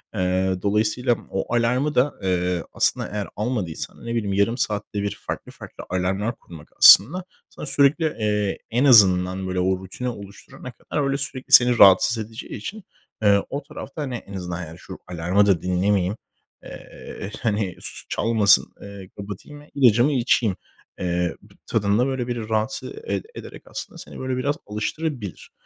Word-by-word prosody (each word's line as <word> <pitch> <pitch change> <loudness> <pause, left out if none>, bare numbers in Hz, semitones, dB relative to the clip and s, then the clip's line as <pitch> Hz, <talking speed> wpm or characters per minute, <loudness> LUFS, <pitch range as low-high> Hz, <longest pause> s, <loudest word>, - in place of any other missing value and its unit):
Eee, 95 0 +1
dolayısıyla 110 +4 +1
m - - -13
o 95 +5 -2
alarmı 125 +6 +1
da, 135 +4 +3
eee, 90 -2 0
aslında - - +1
eğer 105 -1 -4
almadıysan, 105 -5 -4
ne 115 0 -3
bileyim, 100 -4 -1
yarım 100 +5 +1
saatte 105 -2 -2
bir 100 - -2
farklı, - - -5
farklı - - -11
alarmlar 95 +5 -1
kurmak 80 -4 -14
aslında 170 - +8 0.3
sana - - -9
sürekli, 145 +4 +3
eee, 105 -2 0
en 125 +5 +2
azından, 95 -5 +5
böyle, 90 0 -2
o 95 0 +1
rutini 110 +7 -5
oluşturana 100 +3 -10
kadar 145 +5 -4
öyle 140 0 0
sürekli 135 -2 -6
seni 125 -1 +7
rahatsız 100 +4 +7
edeceği 110 +1 -9
için, 200 - -7 0.4
eee, 100 -1 +4
o 140 0 -4
tarafta, 140 +1 -8
hani, 130 -4 -3
en 100 -3 -9
azından, 90 -1 -5
yani 80 +2 -11
şu - - -10
alarmı 90 +4 +1
da 95 -5 +2
dinlemeyeyim, 95 +2 0 0.5
eee, 100 - -9
hani, 105 -6 -1
su - - -8
çalmasın, 110 -4 +3
eee, 100 -2 -10
kapatayım 105 +9 -8
ve 150 - -18
ilacımı 125 0 +4
içeyim, 115 -6 +2 0.4
eee, 90 -1 -1
b - - -20
tadında, 110 +3 +1
böyle, 130 -2 -2
biri 115 -2 -4
rahatsız 110 +4 -2
ede 445 0 -4
ederek - - -10
aslında - - -8
seni, - - -10
böyle, 130 -1 -2
biraz 140 +3 0
alıştırabilir. 105 - -4
105 Hz, 160 wpm, -23 LUFS, 95-125 Hz, 0.5 s, aslında